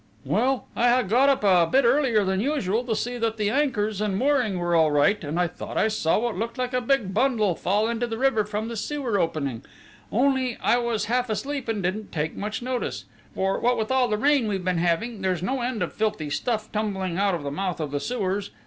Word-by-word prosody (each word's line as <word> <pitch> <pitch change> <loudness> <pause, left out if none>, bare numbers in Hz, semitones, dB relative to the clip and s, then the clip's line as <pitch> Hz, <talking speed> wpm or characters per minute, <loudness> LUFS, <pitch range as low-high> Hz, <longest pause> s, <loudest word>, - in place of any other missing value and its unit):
"Well, 265 0 +1
I 240 - +3
had 240 -4 +3
got 255 +6 +4
up 270 -5 +1
a 180 -4 +4
bit 270 -1 +4
earlier 240 -4 +3
than 190 0 0
usual 235 -4 0
to 225 -3 -1
see 245 +3 -3
that 225 -1 -1
the 210 -1 0
anchors 220 -7 0
and 205 -3 0
mooring 255 -6 +1
were 175 0 -1
all 160 -2 +4
right, 150 +8 +2
and 155 +3 -2
I 180 - +3
thought 175 - -6
I 220 - +3
saw 210 -7 +1
what 235 +1 -1
looked 230 +6 -4
like 250 0 -2
a 250 - +1
big 235 -6 0
bundle 220 -4 +2
fall 205 +6 0
into 235 +1 -1
the 225 -1 -4
river 260 -4 +2
from 210 +1 -4
the 235 - -5
sewer 245 -2 -2
opening 140 -8 -2 0.5
only 260 0 +1
I 240 - +2
was 230 -3 -1
half 245 +2 0
asleep 270 +4 -3
and 215 -4 -2
didn't 200 +4 -3
take 155 0 -2
much 210 +3 -4
notice; 250 -1 -3 0.3
for, 190 0 0
what 245 +1 +2
with 220 +2 -2
all 260 -1 +3
the 210 -2 0
rain 275 0 +3
we've 195 -3 -2
been 180 -2 +1
having, 185 +6 0
there's 185 -2 -1
no 260 +5 -1
end 240 -2 -1
of - - -4
filthy 210 -9 -2
stuff 220 +4 -2
tumbling 190 -4 -2
out 200 -2 +2
of 165 - -6
the 140 - -3
mouth 180 +3 -3
of 150 -3 -3
the 145 - -1
sewers. 200 -1 -2
215 Hz, 230 wpm, -25 LUFS, 190-245 Hz, 0.5 s, got